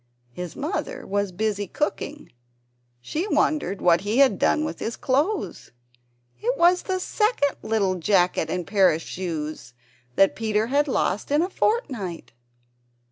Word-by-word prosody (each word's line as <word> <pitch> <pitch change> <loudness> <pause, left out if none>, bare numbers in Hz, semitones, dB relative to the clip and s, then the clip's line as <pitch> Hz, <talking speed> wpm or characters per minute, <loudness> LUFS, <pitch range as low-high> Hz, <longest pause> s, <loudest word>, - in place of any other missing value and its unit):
His 175 +5 -7
mother 365 - -4
was 200 -1 -1
busy 205 +1 -2
cooking; 300 +4 -3 0.7
she 320 - -3
wondered 245 - 0
what 170 -1 +5
he 210 +4 -1
had 275 -1 +5
done 310 - +2
with - - -5
his 225 - -3
clothes. 300 +11 -1 0.7
It 255 +3 0
was 350 +1 +4
the 375 -1 -2
second 425 - 0
little 210 -4 +1
jacket 180 -2 +1
and 180 +1 -2
pair 195 -1 +4
of 160 +1 -3
shoes 155 -8 -5 0.4
that 195 - +4
Peter 220 -1 0
had 285 +5 +1
lost 210 -6 0
in 295 +3 +3
a 370 - -3
fortnight! 255 - -2
220 Hz, 140 wpm, -24 LUFS, 185-300 Hz, 0.7 s, what